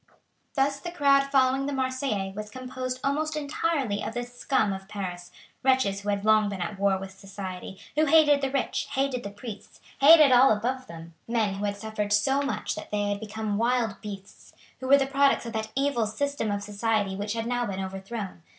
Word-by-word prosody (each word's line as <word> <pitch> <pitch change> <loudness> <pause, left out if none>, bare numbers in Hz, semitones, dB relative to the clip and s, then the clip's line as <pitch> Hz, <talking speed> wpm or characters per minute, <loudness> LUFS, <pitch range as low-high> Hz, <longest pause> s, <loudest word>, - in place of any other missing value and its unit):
Thus 275 0 +1
the 345 - -6
crowd 280 -4 +3
following 270 0 +2
the 285 - -2
Marseillais 260 -7 -1
was 210 0 -6
composed 255 +1 -5
almost 305 +3 0
entirely 285 -6 -1
of 225 - -5
the 245 - -1
scum 245 -3 0
of 190 0 -8
Paris, 180 -4 -6 0.3
wretches 260 -7 +2
who 205 - -4
had 200 0 -1
long 215 -1 +4
been 195 -2 -5
at 190 +3 -4
war 200 -1 +3
with 190 0 -7
society, 190 -1 -8 0.2
who 310 +2 +3
hated 295 -2 +5
the 270 - 0
rich, 275 0 -1
hated 270 -2 0
the 200 - -6
priests, 205 0 -10 0.2
hated 300 0 +8
all 255 +2 +7
above 250 +5 -1
them 165 0 -10
men 225 -4 +1
who 200 +1 -3
had 200 0 -2
suffered 210 -1 -4
so 270 +7 +3
much 280 -1 -2
that 210 - -8
they 205 -1 -1
had 205 0 -1
become 215 -1 -3
wild 235 -3 0
beasts, 200 -2 -10 0.3
who 260 - -5
were 280 +1 +7
the 275 - +1
products 275 -1 +2
of 230 - -6
that 220 0 -3
evil 270 -5 +1
system 280 +1 -2
of 205 0 -2
society 205 -1 -1
which 205 +2 -3
had 225 -1 -3
now 245 0 -1
been 195 -1 -4
overthrown. 195 0 -6
225 Hz, 200 wpm, -27 LUFS, 200-270 Hz, 0.3 s, hated